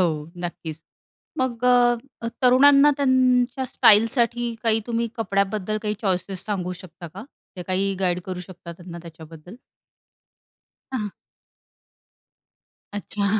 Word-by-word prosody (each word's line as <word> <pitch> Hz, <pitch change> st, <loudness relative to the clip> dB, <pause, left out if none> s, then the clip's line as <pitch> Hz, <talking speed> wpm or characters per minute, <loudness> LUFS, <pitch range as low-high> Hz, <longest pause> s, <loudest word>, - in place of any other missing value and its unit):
हो, 155 Hz, -4 st, 0 dB, 0.2 s
नक्कीच. 160 Hz, -2 st, -6 dB, 0.6 s
मग 250 Hz, -2 st, -1 dB
अ, 245 Hz, -1 st, +5 dB, 0.3 s
अ, 230 Hz, -, -2 dB
तरुणांना 275 Hz, +3 st, +6 dB
त्यांच्या 260 Hz, -1 st, +2 dB
स्टाईलसाठी 235 Hz, +2 st, +3 dB
काही 225 Hz, -1 st, +2 dB
तुम्ही 235 Hz, 0 st, -1 dB
कपड्याबद्दल 200 Hz, 0 st, -1 dB
काही 210 Hz, 0 st, -1 dB
चॉईसेस 190 Hz, -1 st, -2 dB
सांगू 185 Hz, -4 st, -3 dB
शकता 170 Hz, -1 st, -11 dB
का? 190 Hz, +8 st, -10 dB, 0.3 s
की 180 Hz, -, -5 dB
काही 195 Hz, +1 st, 0 dB
गाईड 180 Hz, -1 st, +1 dB
करू 185 Hz, -1 st, -5 dB
शकता 175 Hz, -1 st, -10 dB
त्यांना 170 Hz, 0 st, -10 dB
त्याच्याबद्दल? 165 Hz, +2 st, -12 dB, 1.4 s
हां. 215 Hz, -5 st, -2 dB, 1.8 s
अच्छा. 205 Hz, 0 st, -3 dB
205 Hz, 110 wpm, -23 LUFS, 180-240 Hz, 1.8 s, तरुणांना